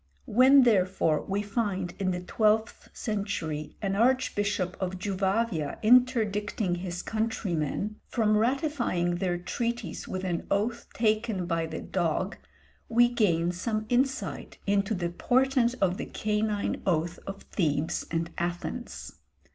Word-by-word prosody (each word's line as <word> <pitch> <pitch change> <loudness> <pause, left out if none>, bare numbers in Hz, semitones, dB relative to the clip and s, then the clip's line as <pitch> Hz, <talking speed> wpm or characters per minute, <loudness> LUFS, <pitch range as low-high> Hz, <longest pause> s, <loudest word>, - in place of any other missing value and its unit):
" 70 - -38
When, 260 +4 +6
therefore, 185 -8 +3
we 200 +1 -2
find 200 -4 -2
in 190 -1 0
the 180 -1 -2
twelfth 215 +3 +1
century 170 -8 -3
an 195 -1 0
archbishop 205 -5 +1
of 185 0 -2
Juvavia 190 -3 -1
interdicting 215 -5 +3
his 175 -1 -4
countrymen 210 -3 -2
from 215 -3 +2
ratifying 235 - +1
their 175 -1 0
treaties 235 +7 -3
with 185 0 -4
an 175 -3 -2
oath 225 +4 0
taken 215 -4 +1
by 165 -1 -1
the - - -5
dog, 185 +2 -1 0.5
we 240 +1 +5
gain 175 -8 +2
some 215 +4 -2
insight 265 +3 -1
into 200 +1 +1
the 175 -2 -2
portent 250 +5 +2
of 185 -1 +2
the - - -5
canine 210 -1 -1
oath 170 -1 0
of 195 0 -6
Thebes 155 -2 0
and 165 +1 -2
Athens. 175 +8 -4
200 Hz, 130 wpm, -28 LUFS, 175-230 Hz, 0.5 s, When